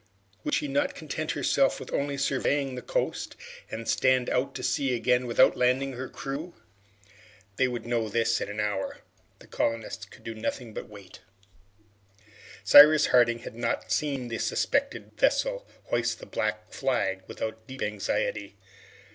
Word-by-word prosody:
Would 300 -2 0
she 300 - -1
not 290 +1 0
content - - -4
herself - - +2
with - - -9
only 140 0 -1
surveying 140 0 0
the 125 - -5
coast, - - -2 0.3
and 115 0 -6
stand 130 -1 +2
out 125 +2 0
to - - -5
sea 135 -3 +1
again 125 +1 +1
without 120 - +5
landing 130 +2 +1
her 130 +1 -6
crew? 150 +5 -6 1.0
They 130 - +3
would 120 -2 -5
know 115 -2 -1
this 115 +1 +1
in - - -3
an 105 +1 -5
hour. 105 -2 -2 0.4
The - - -16
colonists 115 -1 -2
could - - -17
do 115 - -5
nothing 110 +1 -4
but - - -7
wait. 100 -3 -13 1.4
Cyrus 150 +8 +9
Harding 120 -1 +4
had - - -7
not 115 -1 -2
seen 135 0 -1
the 115 - -3
suspected 280 0 -1
vessel - - +1 0.2
hoist 115 -1 -1
the - - -10
black 110 0 -3
flag 95 -7 -1
without 110 0 -6
deep 130 0 -6
anxiety. 105 -1 -2
125 Hz, 155 wpm, -27 LUFS, 110-135 Hz, 1.4 s, Cyrus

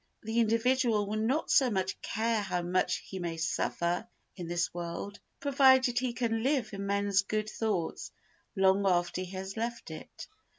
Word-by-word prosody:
The 225 +2 -1
individual 230 -1 +2
will 215 +2 -2
not 255 +8 0
so 265 -3 +5
much 190 -3 -2
care 225 0 0
how 180 -3 -2
much 180 +1 +1
he 190 - -7
may 170 -2 -3
suffer 170 +4 -1 0.3
in 175 -3 -6
this 175 0 -1
world 175 +4 -5 0.2
provided 260 -3 +4
he 255 -1 -1
can 230 -1 -1
live 265 -2 0
in 200 0 -4
men's 200 -1 +2
good 215 +1 -2
thoughts 205 -7 -2 0.4
long 195 0 +3
after 175 0 +1
he 185 - -6
has 190 +1 -5
left 235 +1 -4
it. - - -9
205 Hz, 165 wpm, -30 LUFS, 185-235 Hz, 0.4 s, so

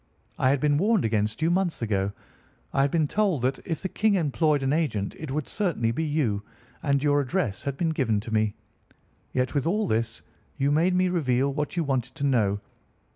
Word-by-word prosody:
I 130 - +4
had 140 +1 +2
been 145 +1 +2
warned 210 - +3
against 110 +4 0
you 165 - +3
months 175 -7 0
ago. 100 -3 0 0.6
I 135 - +3
had 140 - +3
been 155 0 +1
told 190 - +1
that, 130 +1 0
if 165 +1 -3
the - - 0
King 210 +2 +2
employed 155 -3 +1
an 135 +1 +1
agent, 120 -12 0
it 155 - -6
would 145 +1 -2
certainly 165 - 0
be 160 +8 -1
you. 145 -10 0 0.4
And 140 -2 +1
your 145 -1 +3
address 135 - -1
had 140 -1 -2
been 165 +1 +1
given 125 -9 +1
me. 110 -1 +1 0.8
Yet, 125 -1 0
with 145 0 0
all 210 +5 +1
this, 115 - -1 0.3
you 140 0 +2
made 170 +5 +3
me 185 0 +3
reveal 140 -5 +1
what 150 +4 -3
you 170 - +2
wanted 130 -3 -2
to - - -5
know. 105 -7 +2
140 Hz, 200 wpm, -26 LUFS, 120-165 Hz, 0.8 s, I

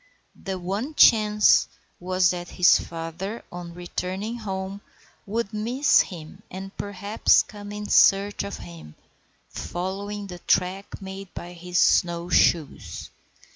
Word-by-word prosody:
The 190 -1 -3
one 200 - -4
chance 210 -4 +5 0.3
was 185 0 +2
that 175 -1 -5
his 180 -2 +6
father, 170 +6 -6
on 175 -1 -8
returning 185 +5 -4
home, 195 -1 -5 0.5
would 220 0 -2
miss 245 +7 +3
him, 160 -5 -9
and 195 +2 -8
perhaps 205 +2 +2
come 205 -1 -10
in 210 0 -6
search 200 +1 +4
of 200 - -5
him, 80 -3 -11 0.5
following 200 +3 -5
the 180 -2 -9
track 185 +3 -1
made 190 0 -8
by 175 +1 -7
his 180 +1 -4
snow 175 0 +3
shoes. 165 -3 +1
190 Hz, 125 wpm, -25 LUFS, 175-205 Hz, 0.5 s, his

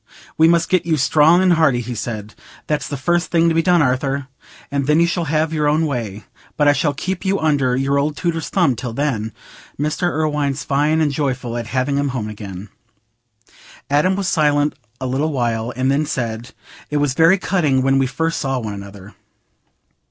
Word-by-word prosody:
'We 160 - +5
must 170 0 +3
get 185 -2 +2
you 160 -2 +2
strong 155 +5 +4
and 185 -1 +4
hearty,' 155 -7 +3
he 120 +1 -5
said, 110 -2 -5 0.3
'that's 150 -1 -2
the 145 - -4
first 175 +6 0
thing 170 0 +3
to - - +1
be 165 - +3
done 175 -2 +3
Arthur, 135 +1 -1 0.4
and 140 -1 -1
then 150 +2 +4
you 170 - +5
shall 170 0 -1
have 155 +1 0
your 150 -2 +1
own 155 +2 +2
way. 115 -8 -4 0.3
But 150 - +3
I 145 - +6
shall 145 0 0
keep 185 +6 -4
you 195 0 0
under 145 -5 +1
your 135 +2 +1
old 145 +1 -1
tutor's 165 -3 -2
thumb 170 -10 +2
till 125 -1 -5
then.' 115 -5 -2 0.5
Mr. 150 +4 0
Irwine's 150 -3 -1
fine 150 +3 +1
and 150 -2 +2
joyful 130 -4 -2
at 120 -2 -4
having 130 +3 -1
him 140 0 0
home 110 -2 -3
again." 100 -2 -8 1.2
Adam 150 +7 +3
was 195 -1 -2
silent 150 -3 +2 0.3
a 130 - -4
little 135 +5 -1
while, 120 -3 -1
and 130 +1 +1
then 145 +2 0
said, 120 -4 -4 0.4
"It 150 - -1
was 145 -2 +1
very 165 +6 +5
cutting 155 -9 +1
when 135 0 +3
we 135 - +2
first 165 +5 -2
saw 135 -2 -1
one 110 -4 -4
another. 100 0 -10
145 Hz, 195 wpm, -19 LUFS, 125-160 Hz, 1.2 s, I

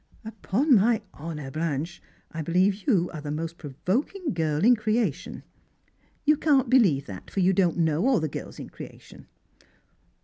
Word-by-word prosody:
" - - -29
Upon 225 +6 0
my 220 +2 +2
honour, 150 -3 -7
Blanche, 160 +2 -3 0.3
I 165 - -5
beHeve 185 - +1
you 180 -9 +2
are 155 - -6
the 145 - -6
most 165 +3 -4
pro 150 - -7 0.2
voking 295 - -1
girl 160 +1 0
in 245 +1 +7
creation! 215 - -2 0.3
" - - -41
" - - -39
You 300 0 +4
can't 275 -5 +2
believe 185 - +4
that, 95 -2 -9
for - - -3
you 190 +1 +4
don't 180 -3 +2
know 165 - +1
all 265 -6 +3
the 155 - -1
girls - - -7
in - - -9
creation." - - -12
180 Hz, 180 wpm, -26 LUFS, 155-230 Hz, 0.3 s, in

